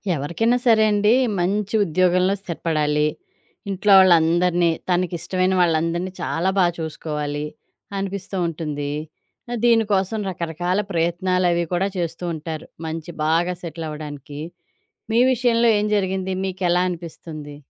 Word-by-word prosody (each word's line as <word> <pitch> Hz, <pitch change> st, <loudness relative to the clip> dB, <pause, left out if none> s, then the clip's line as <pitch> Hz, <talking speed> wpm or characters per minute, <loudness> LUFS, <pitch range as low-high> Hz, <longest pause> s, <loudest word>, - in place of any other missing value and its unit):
ఎవరికైనా 170 Hz, -, +1 dB
సరే 225 Hz, -2 st, +5 dB
అండి, 210 Hz, +2 st, +3 dB, 0.3 s
మంచి 200 Hz, +4 st, 0 dB
ఉద్యోగంలో 185 Hz, +2 st, +2 dB
స్థిరపడాలి. 155 Hz, -4 st, 0 dB, 0.6 s
ఇంట్లో 195 Hz, +1 st, +3 dB
వాళ్ళందరినీ, 175 Hz, -1 st, +4 dB, 0.2 s
తనకిష్టమైన 185 Hz, +1 st, 0 dB
వాళ్ళందరిని 170 Hz, +2 st, +1 dB
చాలా 170 Hz, +4 st, 0 dB
బా 185 Hz, -, +5 dB
చూసుకోవాలి 150 Hz, -2 st, -4 dB, 0.5 s
అనిపిస్తూ 195 Hz, 0 st, -4 dB
ఉంటుంది. 150 Hz, -3 st, -4 dB, 0.6 s
అ -, -, -1 dB
దీనికోసం 220 Hz, -3 st, +2 dB
రకరకాల 175 Hz, +1 st, -2 dB
ప్రయత్నాలవీ 175 Hz, 0 st, +1 dB
కూడా 185 Hz, +2 st, +1 dB
చేస్తూ 170 Hz, 0 st, -3 dB
ఉంటారు. 160 Hz, 0 st, -6 dB, 0.2 s
మంచి 160 Hz, +1 st, -5 dB
బాగా 170 Hz, +3 st, +2 dB
సెటిల్ 165 Hz, -1 st, -6 dB
అవ్వడానికి. 145 Hz, -1 st, -8 dB, 0.7 s
మీ 230 Hz, -, +3 dB
విషయంలో 235 Hz, -1 st, +3 dB
ఏం 210 Hz, -, 0 dB
జరిగింది? 190 Hz, -1 st, -1 dB
మీకెలా 180 Hz, -2 st, +1 dB
అనిపిస్తుంది? 160 Hz, -3 st, -8 dB
175 Hz, 110 wpm, -22 LUFS, 160-190 Hz, 0.7 s, సరే